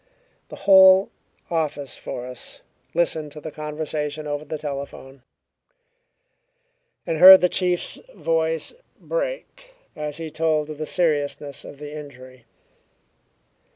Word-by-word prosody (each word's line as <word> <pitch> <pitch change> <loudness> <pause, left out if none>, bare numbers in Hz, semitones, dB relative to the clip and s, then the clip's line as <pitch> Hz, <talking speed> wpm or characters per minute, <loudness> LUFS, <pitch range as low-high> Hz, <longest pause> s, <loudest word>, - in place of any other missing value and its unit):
The - - -9
whole 190 0 +7 0.4
office 150 -5 -2
force 125 0 -8 0.3
listened 160 -3 0
to 155 - -9
the 155 +1 -8
conversation 150 0 -4
over 145 0 -3
the 155 +1 -5
telephone, 140 -2 -7 1.8
and 160 - -2
heard 190 +2 +11
the 180 - +4
chief's 180 -1 0 0.2
voice 165 - -1 0.3
break - - -5 0.2
as 150 -1 -5
he 165 -1 -6
told 155 -1 0
of 150 - -9
the 155 - -4
seriousness 145 -4 -1
of 145 - -11
the 150 +1 -9
injury. 130 -4 -12
155 Hz, 115 wpm, -23 LUFS, 145-165 Hz, 1.8 s, heard